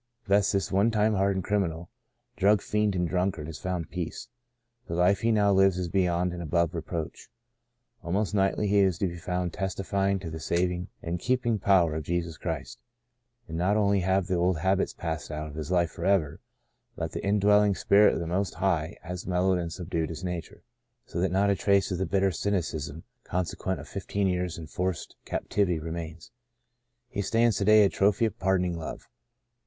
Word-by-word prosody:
Thus 100 0 +3
this 100 -1 0
one 100 +4 +3
time 110 -1 +2
hardened 95 -1 +1
criminal, 85 -5 -1 0.5
drug 100 +1 +3
fiend 105 -2 0
and 90 -1 0
drunkard, 90 -2 -1
has 80 0 -7
found 90 -3 -3
peace. 90 -3 -5 0.6
The 85 - -3
life 90 +3 +3
he 115 - +2
now 105 -2 +3
lives 95 -1 +4
is 90 -2 -2
beyond 90 -1 +1
and 90 - -5
above 85 +1 0
reproach. 80 -1 -5 0.7
Almost 100 +5 -1
nightly 95 +1 +1
he 100 0 +3
is 95 -4 +3
to 95 - 0
be 85 -1 -6
found 90 0 -2
testifying 95 0 -1
to 90 -4 -7
the 80 - -6
saving 90 +2 -1 0.2
and 85 +1 -3
keeping 120 0 0
power 90 -5 +4
of 80 - -2
Jesus 85 0 -2
Christ. - - -5 0.7
And 80 -2 -4
not 100 +4 +2
only 100 -1 +3
have 95 +1 +1
the 95 - -2
old 90 0 +2
habits 95 +4 +1
passed 80 -3 -5
out 75 0 -4
of 75 - -9
his 75 -1 -5
life 85 -2 +2
forever, 90 -4 0 0.6
but - - -4
the - - -5
indwelling 105 0 +4
Spirit 100 +4 +4
of - - -2
the 85 - -3
Most 90 +3 -1
High 85 -3 0
has 90 +1 -6
mellowed 90 0 +2
and 85 -1 -4
subdued 85 -2 -3
his 85 +2 -7
nature; 90 -2 -5 0.4
so 85 - -4
that 95 -1 +1
not 100 +2 +3
a - - +2
trace 100 0 +2
of 90 - -2
the 95 - -1
bitter 95 0 +2
cynicism 80 -5 -2 0.2
consequent 90 +1 -2
on - - -9
fifteen 100 +1 -3
years' 90 -2 -1
en 85 - -7
forced 90 +3 -3
captivity 95 -5 0
remains. 80 +3 -6 0.8
He 100 - -3
stands 115 +3 +2
to 100 - 0
day 110 0 +7
a 100 - +4
trophy 100 +4 +2
of 110 - -3
pardoning 90 -2 +1
Love. 80 - -7
90 Hz, 190 wpm, -27 LUFS, 85-100 Hz, 0.8 s, day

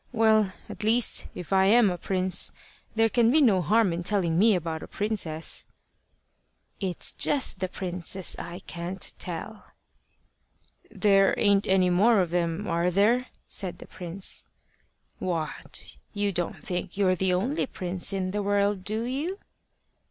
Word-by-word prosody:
Well, 220 -4 +3 0.2
at 210 - -8
least, 230 +2 +3
if 180 +2 -5
I 190 0 +4
am 220 -1 +5
a 175 - -3
prince, 185 -1 +1 0.4
there 225 0 +4
can 230 0 +3
be 300 +6 +4
no 215 -10 +4
harm 200 +2 +3
in 170 - -3
telling 175 -4 +1
me 215 0 +5
about 165 -2 -3
a - - -8
princess." 195 -7 -1 1.1
"It's 185 -4 -3
just 275 -9 +2
the 185 - -1
princes 180 0 -4
I 175 +2 -7
can't 175 +2 -5
tell." 185 +5 -4 1.3
"There 195 -2 +3
ain't 200 -1 +3
any 185 -1 +3
more 210 +5 +4
of 180 -3 0
them 175 +2 -1
are 170 +1 +1
there?" 220 +7 +2 0.2
said 185 -4 -4
the - - -11
prince. 180 +2 -5 0.7
"What! 165 -4 -3 0.2
you 205 -1 0
don't 175 +5 -3
think 180 -2 -4
you're 190 -2 +3
the 185 0 +1
only 260 - -1
prince 180 -2 -3
in 190 -1 -2
the 205 +1 -1
world, 200 -1 +1
do 215 +4 0
you?" 285 +10 -3
195 Hz, 150 wpm, -27 LUFS, 180-215 Hz, 1.3 s, am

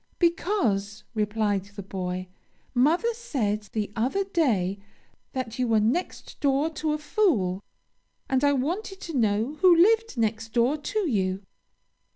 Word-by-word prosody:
'Because,' 330 - 0
replied 210 -2 0
the 200 0 -9
boy, 185 -1 -4 0.5
'mother 325 - +3
said 215 - -2
the 210 -2 -2
other 260 - +1
day, 235 - 0 0.5
that 255 -3 -4
you 250 - +1
were 225 -1 +3
next 240 +13 -2
door 285 +2 +2
to 310 -1 -1
a - - 0
fool; 295 - +1 0.7
and 265 +1 +1
I 285 - +5
wanted 355 +9 -2
to 330 - -6
know 225 +4 +1
who 365 -2 +7
lived 445 - +4
next 225 0 -1
door 245 +4 +3
to 360 +7 -2
you.'" 190 -6 0
250 Hz, 140 wpm, -26 LUFS, 210-335 Hz, 0.7 s, who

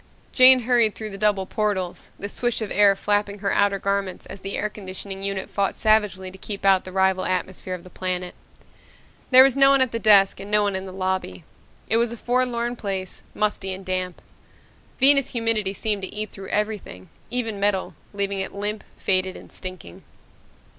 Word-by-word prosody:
Jane 255 0 +8
hurried 235 -3 +2
through 215 -1 -6
the 195 - -7
double 205 -2 +2
portals, 200 -4 -3
the 200 - -4
swish 240 +3 -2
of 220 -2 -5
air 200 0 +5
flapping 205 0 -1
her 200 0 -1
outer 200 -1 +2
garments 200 -1 -2
as 195 - -10
the 195 +1 -4
air 210 - -1
conditioning 195 -1 -8
unit 195 -1 -3
fought 200 -1 -1
savagely 210 -4 +1
to 190 - -14
keep 200 0 -5
out 190 -1 +4
the 185 - -8
rival 190 0 +1
atmosphere 185 0 -3
of 175 - -11
the 185 - -13
planet. 180 -1 -3 1.0
There 260 0 +9
was 270 -1 +3
no 275 0 +6
one 275 0 +5
at 260 -2 +2
the 230 - -3
desk 200 -4 +5
and 195 +1 -8
no 210 0 +3
one 200 -1 0
in 190 0 -4
the - - -8
lobby. 185 - -3 0.4
It 225 - +2
was 235 0 +1
a 235 - -6
forlorn 245 0 -1
place, 190 -3 -4
musty 205 -3 -1
and 190 0 -12
damp. 185 -1 -3 0.8
Venus 275 0 +5
humidity 225 -4 0
seemed 205 +1 -2
to 190 - -5
eat 215 0 -5
through 195 -1 -9
everything, 210 - -3 0.2
even 225 -4 -2
metal, 200 -1 0 0.2
leaving 200 -1 -2
it 190 - -4
limp, 210 +1 -2
faded, 185 -1 0
and - - -14
stinking. 185 - -9
200 Hz, 190 wpm, -23 LUFS, 190-220 Hz, 1.0 s, There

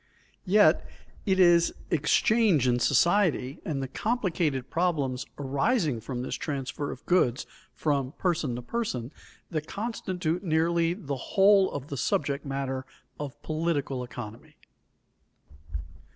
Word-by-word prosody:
Yet, 205 +3 +5 0.4
it 190 -1 +2
is 175 -2 +5 0.2
exchange 170 - +3
in 120 0 +2
society 170 - +2
and 140 -5 -2
the - - -3
complicated 170 - -1
problems 145 -7 0
arising 145 - +1
from 125 +1 -4
this - - -4
transfer 140 -1 -3
of 130 - -8
goods 130 -9 +2 0.3
from 140 -3 -1
person 165 -9 -1
to 120 - -6
person 130 - -3 0.4
that 155 -2 -3
constitute 185 -6 -3
nearly 165 0 +2
the 145 -9 -4 0.2
whole 195 0 +6
of 145 0 -6
the 140 - -4
subject 140 +2 -1
matter 135 -1 -2 0.4
of 145 -3 -6
political 155 -5 -1
economy. 120 -3 -9
150 Hz, 120 wpm, -28 LUFS, 135-180 Hz, 0.4 s, whole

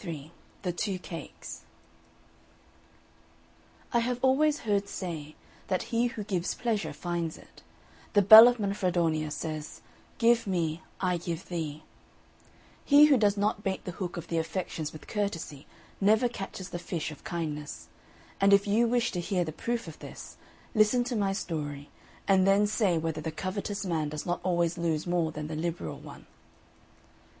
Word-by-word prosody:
XXIII 160 -5 -7 0.3
THE 180 - 0
TWO 190 +2 -2
CAKES 165 -3 -8 2.3
I 235 - +4
have 240 +1 0
always 295 +4 +3
heard 200 -2 0
say, 155 -5 -5 0.3
that 185 +4 -2
he 235 +1 +3
who 230 -3 -5
gives 185 -4 -2
pleasure 225 -4 -1
finds 170 -2 -3
it: - - -17 0.5
the 205 -1 +5
bell 220 +4 +12
of 245 -1 +2
Manfredonia 175 -6 0
says, 155 0 -5 0.4
"Give 230 -1 +3
me, 170 -3 -1 0.2
I 180 -2 +1
give 170 +1 -5
thee": 155 -3 -4 1.0
he 290 +1 +7
who 290 -3 +5
does 205 -2 +2
not 210 +1 0
bait 190 -2 -3
the 180 - -3
hook 180 -1 -5
of 170 -1 -6
the 165 - 0
affections 160 -2 -3
with 155 - -11
courtesy 170 -9 -4 0.3
never 215 +5 +4
catches 195 -4 -7
the 175 - -5
fish 165 -2 -4
of 150 - -12
kindness; 150 - -5 0.5
and 200 0 +6
if 200 0 +5
you 220 +4 +3
wish 240 0 +1
to 180 - -3
hear 180 +1 0
the 155 - -4
proof 235 +6 -3
of 160 - -10
this, - - -10 0.4
listen 215 +2 +4
to 245 0 -3
my 200 -3 +1
story, 145 -6 -4 0.4
and 190 -1 +4
then 200 +1 +5
say 205 -4 +1
whether 160 -1 -2
the 160 - -3
covetous 200 +4 -4
man 160 -4 -1
does 150 0 -5
not 175 0 -1
always 170 -1 0
lose 160 -3 0
more 175 -2 0
than 150 0 -5
the 155 +1 -5
liberal 170 +2 -3
one. - - -12
180 Hz, 160 wpm, -29 LUFS, 160-210 Hz, 2.3 s, bell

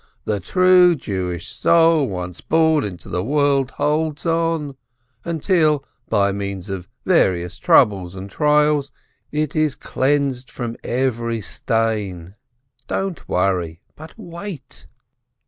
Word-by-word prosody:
The 105 -2 -1
true 180 - +5
Jewish 90 - -4
soul 165 - +3
once 90 -2 -6
born 160 -2 +2
into 90 -4 -7
the 90 - -2
world 140 0 +2
holds 150 +2 -1
on, 165 -4 0 0.5
until, 160 -3 +1 0.2
by 100 -2 +2
means 100 -1 -5
of 95 -2 -5 0.2
various 90 -2 +2
troubles 95 -3 +3
and 95 +1 -7
trials, 150 +4 +2 0.4
it 150 -1 -2
is 155 -3 +1
cleansed 135 -2 -1
from 120 -2 -5
every 120 -2 -1
stain. 105 -5 -2 0.5
Don't 195 -3 -3
worry, 90 -2 0
but 160 +6 -12
wait." 175 - -9
135 Hz, 110 wpm, -20 LUFS, 95-155 Hz, 0.5 s, true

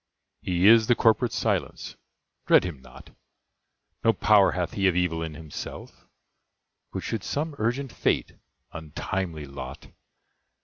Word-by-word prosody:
He 90 0 0
is 110 0 +7
the 120 - +4
corporate 115 +1 +3
Silence: - - -2 0.5
dread - - +6
him 85 -7 -6
not! - - -15 0.9
No 115 - +4
power 105 -3 +4
hath 90 -1 -2
he 100 -1 +1
of 90 - +2
evil 90 -2 0
in 80 -2 -5
himself; 75 -1 -9 0.8
But - - -5
should 110 -4 -3
some 150 +2 -2
urgent 120 +4 -1
fate - - 0 0.4
(untimely 80 0 -4
lot!) 70 -1 -9
90 Hz, 130 wpm, -26 LUFS, 80-115 Hz, 0.9 s, is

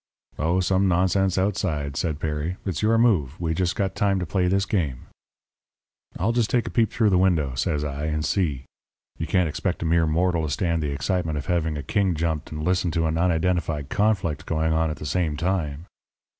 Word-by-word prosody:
"'Oh, 85 +5 +1
some 95 +2 +2
nonsense 95 +1 +2
outside,' 90 -8 -1
says 80 +1 -1
Perry. 80 +3 -3
'It's 90 -6 -2
your 115 +1 +3
move. 90 - +2
We 80 -2 -1
just 90 +4 0
got 95 -3 -1
time 100 -1 +1
to 90 - -2
play 90 +2 0
this 95 +2 +2
game.' 75 - -2 1.1
"'I'll 100 +6 +1
just 120 -2 +1
take 120 -2 +1
a - - -5
peep 115 -2 +2
through 110 -3 +2
the 90 - +4
window,' 80 -8 +2
says 75 +4 -1
I, 75 0 -3
'and 75 0 -1
see. 75 -10 -1 0.5
You 80 - -2
can't 90 -3 +2
expect 85 +3 -2
a - - -3
mere 80 0 +3
mortal 85 +2 +1
to 75 - -2
stand 85 +4 0
the 75 - -1
excitement 80 +2 -1
of 70 - -4
having 80 -3 0
a 70 - -5
king 95 -2 +1
jumped 80 -2 -2
and 75 0 -5
listen 90 +1 +1
to 80 - +2
an 80 +1 0
unidentified 85 -4 0
conflict 90 -8 0
going 80 0 +1
on 80 0 +1
at 75 - -4
the 75 - -8
same 75 +1 -1
time.' 85 -3 -2
85 Hz, 205 wpm, -24 LUFS, 75-95 Hz, 1.1 s, the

